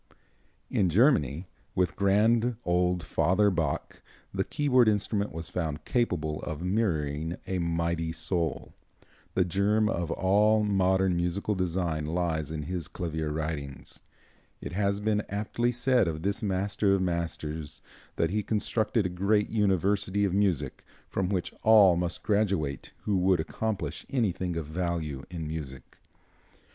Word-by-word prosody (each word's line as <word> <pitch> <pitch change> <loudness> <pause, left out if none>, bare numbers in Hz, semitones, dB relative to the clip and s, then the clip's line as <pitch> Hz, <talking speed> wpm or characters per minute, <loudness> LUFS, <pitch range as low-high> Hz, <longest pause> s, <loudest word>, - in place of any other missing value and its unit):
In 95 - +2
Germany, 90 - +3 0.3
with 90 -2 +1
grand 110 +4 +3
old 90 0 +1
Father 100 +6 +2
Bach, 80 -5 -2 0.3
the - - 0
keyboard 130 -5 +3
instrument 105 0 +1
was 80 0 -6
found 80 -3 -3
capable 85 -11 0
of 80 +2 -5
mirroring 80 -5 -1
a 95 -1 -2
mighty 85 -1 -1
soul. 80 -1 -2 0.6
The 95 - +3
germ 100 +4 +2
of 85 -6 -1
all 105 +3 +3
modern 95 -2 +2
musical 90 +4 0
design 85 -4 -1
lies 80 -2 -1
in 80 -1 -4
his 85 0 -4
clavier 80 -4 -3
writings. 75 -3 -5 0.6
It - - -6
has 100 +2 0
been 105 0 +1
aptly 110 +4 -1
said 125 -3 +2
of 80 -1 -3
this 100 +4 -1
master 100 0 +1
of 95 - 0
masters 80 -3 -3 0.3
that - - +1
he 105 +1 +1
constructed 110 +1 0
a - - +3
great 100 +4 +1
university 100 -1 +1
of 95 - -1
music, 95 -6 0 0.3
from 95 -1 -1
which 95 -3 -2
all 105 -5 +7
must 85 0 -2
graduate 95 - 0
who 100 -3 +1
would 90 -1 +3
accomplish 105 +5 -3
anything 95 -8 -1
of 80 - -3
value 80 -3 -3
in 85 -3 -5
music. 70 -5 -7
90 Hz, 135 wpm, -28 LUFS, 80-105 Hz, 0.6 s, all